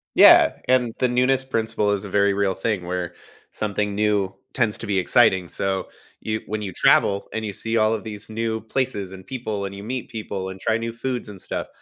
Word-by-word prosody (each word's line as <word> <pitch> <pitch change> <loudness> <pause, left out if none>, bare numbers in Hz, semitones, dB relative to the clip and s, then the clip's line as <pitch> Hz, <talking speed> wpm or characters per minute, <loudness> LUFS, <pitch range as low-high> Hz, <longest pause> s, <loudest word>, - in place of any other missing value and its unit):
Yeah, - - +7
and 125 -3 +2
the 125 - +3
newness 130 +2 +2
principle 110 -4 0
is 100 -1 -1
a 100 - -7
very 100 0 +3
real 100 -1 +1
thing 95 -2 -2
where, 90 -1 -3 0.4
something 105 -1 -2
new 105 -2 +1 0.2
tends 115 -5 +1
to - - -7
be 100 -2 +1
exciting. 95 -2 +4
So, 95 +1 -2 0.3
you 110 0 -3
when 110 0 -3
you 95 -3 -5
travel 100 +3 +3
and 110 0 -2
you 100 - -4
see 115 +3 -1
all 110 0 +3
of 110 - -3
these 105 -1 -8
new 110 0 -2
places 110 -5 -2
and 95 0 -11
people 110 -6 -4
and 100 - -6
you 100 +1 -8
meet 125 +2 -4
people 100 -5 -5
and 95 - -8
try 110 +3 +1
new 115 0 -3
foods 125 -1 -3
and 100 -2 -10
stuff, 95 - -4
105 Hz, 215 wpm, -23 LUFS, 100-115 Hz, 0.4 s, Yeah